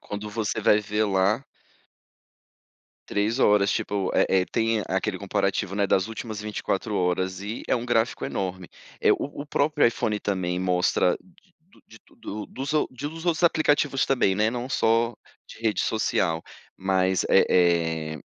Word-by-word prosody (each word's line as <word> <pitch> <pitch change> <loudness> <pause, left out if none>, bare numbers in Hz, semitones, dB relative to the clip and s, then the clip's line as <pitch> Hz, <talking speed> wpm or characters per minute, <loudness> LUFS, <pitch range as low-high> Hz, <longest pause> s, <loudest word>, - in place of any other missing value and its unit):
quando 105 +1 -6
você 110 0 -2
vai 105 0 +4
ver 105 +1 -1
lá 100 +5 +1 1.6
3 105 +4 0
horas, 105 -5 +4
tipo, 100 -2 -1
eh - - +4
eh, - - 0
tem 115 -1 0
aquele 95 +1 -1
comparativo, 100 -1 -1
né, 100 0 +1
das 95 +1 +1
últimas 110 -1 -6
24 105 0 -3
horas 95 +1 0
e 105 +3 -5
é - - +3
um 120 - -4
gráfico 115 -1 0
enorme, 95 -2 -4 0.3
eh, - - +5
o 145 0 -4
o - - -13
próprio 150 +1 +2
iPhone 110 -2 0
também 90 -3 -1
mostra, 90 0 +2
de 185 0 -27
do 175 +5 -26
de 110 - -15
tudo 105 +1 -8
o - - -8
dos 135 +3 -5
ou 155 - +1
de 130 +3 -5
dos 165 +2 -9
outros 170 0 +1
aplicativos 145 -4 +2
também, 125 -8 +2
né, 105 +3 +2
não 125 +1 -4
só 115 -2 +2 0.3
de - - -13
rede 110 -3 +1
social, 85 -6 0 0.3
mas, 95 -1 +1
eh - - +5 0.7
eh, 80 - -8
105 Hz, 165 wpm, -25 LUFS, 95-120 Hz, 1.6 s, eh